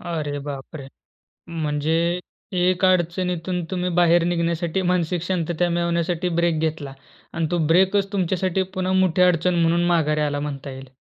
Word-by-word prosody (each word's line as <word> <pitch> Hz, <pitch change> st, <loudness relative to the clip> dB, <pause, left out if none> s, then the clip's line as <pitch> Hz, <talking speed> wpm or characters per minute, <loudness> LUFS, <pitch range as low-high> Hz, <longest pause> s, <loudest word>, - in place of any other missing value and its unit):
अरे 155 Hz, -4 st, -3 dB
बापरे! 140 Hz, 0 st, -7 dB, 0.6 s
म्हणजे 155 Hz, -1 st, -1 dB, 0.7 s
एक 185 Hz, +1 st, +1 dB
अडचणीतून 180 Hz, 0 st, 0 dB
तुम्ही 180 Hz, 0 st, -1 dB
बाहेर 175 Hz, -1 st, +4 dB
निघण्यासाठी 170 Hz, +1 st, -1 dB
मानसिक 175 Hz, -1 st, 0 dB
शांतता 175 Hz, -1 st, -1 dB
मिळवण्यासाठी 170 Hz, +1 st, 0 dB
ब्रेक 170 Hz, -2 st, +1 dB
घेतला 155 Hz, -4 st, -3 dB, 0.4 s
अन् 165 Hz, -1 st, -1 dB
तो 175 Hz, -, +1 dB
ब्रेकचं 190 Hz, +4 st, +3 dB
तुमच्यासाठी 185 Hz, 0 st, 0 dB
पुन्हा 185 Hz, 0 st, -1 dB
मोठी 185 Hz, -1 st, +2 dB
अडचण 180 Hz, 0 st, +3 dB
म्हणून 170 Hz, +1 st, +2 dB
माघारी 155 Hz, -3 st, +1 dB
आला 145 Hz, -1 st, -1 dB
म्हणता 140 Hz, -1 st, -5 dB
येईल. 130 Hz, 0 st, -10 dB
170 Hz, 135 wpm, -22 LUFS, 160-180 Hz, 0.7 s, बाहेर